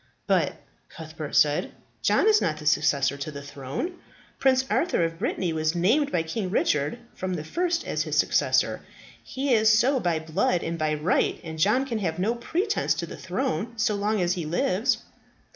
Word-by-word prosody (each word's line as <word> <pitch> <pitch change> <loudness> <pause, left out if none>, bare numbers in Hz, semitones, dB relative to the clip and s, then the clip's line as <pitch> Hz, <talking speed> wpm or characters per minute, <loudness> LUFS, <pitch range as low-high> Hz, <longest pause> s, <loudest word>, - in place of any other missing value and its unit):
"But," - - +2 0.4
Cuthbert - - -7
said, - - +3 0.3
"John - - +3
is 430 -1 +5
not 155 - 0
the 155 - -10
successor 145 -2 +2
to 140 +2 -5
the 140 -1 -8
throne. 140 - -5 0.4
Prince 260 -1 +3
Arthur 325 - +1
of 165 0 -5
Brittany 175 -4 -1
was 155 +1 0
named 250 - +2
by 165 - +1
King 185 +4 -3
Richard 150 -2 +1 0.2
from 185 -1 -3
the 155 - -4
first 345 - -1
as - - -1
his - - -2
successor. - - +2 0.4
He 270 0 -1
is 220 -1 +5
so 260 +4 +3
by 175 -6 0
blood 160 +2 0
and 165 0 -3
by 155 0 +1
right, 150 +4 +1
and 160 -1 -7
John 210 +10 +3
can 235 -5 -3
have 165 -5 -2
no 200 +6 +1
pretence 345 - -1
to - - -3
the - - -9
throne 235 -3 -3
so 215 - +1
long 210 +1 0
as 175 0 +1
he 180 -3 -3
lives." 180 +7 0
180 Hz, 185 wpm, -26 LUFS, 155-245 Hz, 0.4 s, is